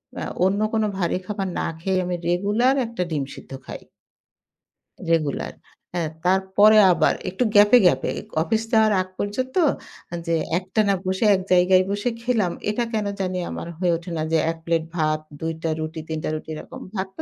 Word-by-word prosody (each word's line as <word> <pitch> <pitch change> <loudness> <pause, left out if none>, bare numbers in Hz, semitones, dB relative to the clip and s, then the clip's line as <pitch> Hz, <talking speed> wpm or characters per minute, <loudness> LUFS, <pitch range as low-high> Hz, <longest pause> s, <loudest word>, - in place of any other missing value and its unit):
অ্যা - - -4 0.2
অন্য 195 +2 +1
কোন 220 -1 +2
ভারী 175 -2 0
খাবার 200 -1 -3
না - - -1
খেয়ে 190 +1 0
আমি 180 0 -2
রেগুলার 205 +9 +2
১ 230 - -8
টা 180 - +1
ডিম 145 -3 0
সিদ্ধ - - -13
খাই। - - -8 1.3
রেগুলার। 140 - 0 0.4
হ্যাঁ, 170 -3 -1 0.2
তারপরে 190 +3 +5
আবার 160 -3 +3 0.2
একটু 190 +7 -1
গ্যাপ 205 0 +7
এ - - +6
গ্যাপে 135 -7 +3 0.3
অফিস 220 +5 0
যাওয়ার 220 -1 +4
আগ 185 - -5
পর্যন্ত, 255 +6 -3 0.7
যে 165 - +2 0.2
একটানা 200 +2 +1
বসে 190 +4 0
এক 190 - -2
জায়গায় 185 +1 +5
বসে 205 +4 -1
খেলাম। 225 -7 +1 0.2
এটা 215 +3 0
কেন 215 -1 0 0.2
জানি 185 -1 -2
আমার - - -6
হয়ে 180 -2 +2
ওঠে 170 +1 -9
না, - - -1
যে 165 - +4
১ 165 - -8
প্লেট 165 -1 +1
ভাত, 155 -2 +1 0.2
২ 165 0 -2
টা 165 - 0
রুটি, 160 0 -4
৩ 160 - -2
টা - - -1
রুটি 155 - -7
এরকম। - - -9
ভাত 190 -1 -2
তো - - -4
185 Hz, 185 wpm, -23 LUFS, 165-210 Hz, 1.3 s, গ্যাপ